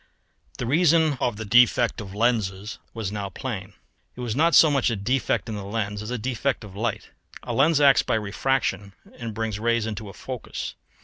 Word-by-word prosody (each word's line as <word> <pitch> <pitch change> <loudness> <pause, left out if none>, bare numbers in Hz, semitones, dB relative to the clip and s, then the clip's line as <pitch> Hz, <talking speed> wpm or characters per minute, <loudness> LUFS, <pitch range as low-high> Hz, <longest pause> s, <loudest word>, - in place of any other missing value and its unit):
The 125 - -3
reason 160 +2 +3
of 120 - 0
the 110 - -5
defect 120 +1 +4
of 100 -1 -9
lenses 105 -3 0
was 110 -4 -4
now 100 -2 -4
plain: 95 -3 -6 0.4
it 125 - -8
was 120 -2 -2
not 165 +4 +3
so 155 - +7
much 135 -3 +2
a 115 - -1
defect 125 +7 0
of 110 - -4
the 105 -1 -5
lens 100 0 -3
as 105 - -6
a 125 - -2
defect 125 +2 -2
of 100 -3 -11
light. 105 0 -3 0.3
A - - -4
lens 150 +3 +4
acts 140 -2 +6
by - - 0
refraction 105 -1 -1 0.3
and 115 -3 -5
brings 110 -2 -2
rays 115 0 +1
to 105 0 -7
a - - -10
focus. 130 -3 -6
115 Hz, 195 wpm, -24 LUFS, 105-130 Hz, 0.4 s, so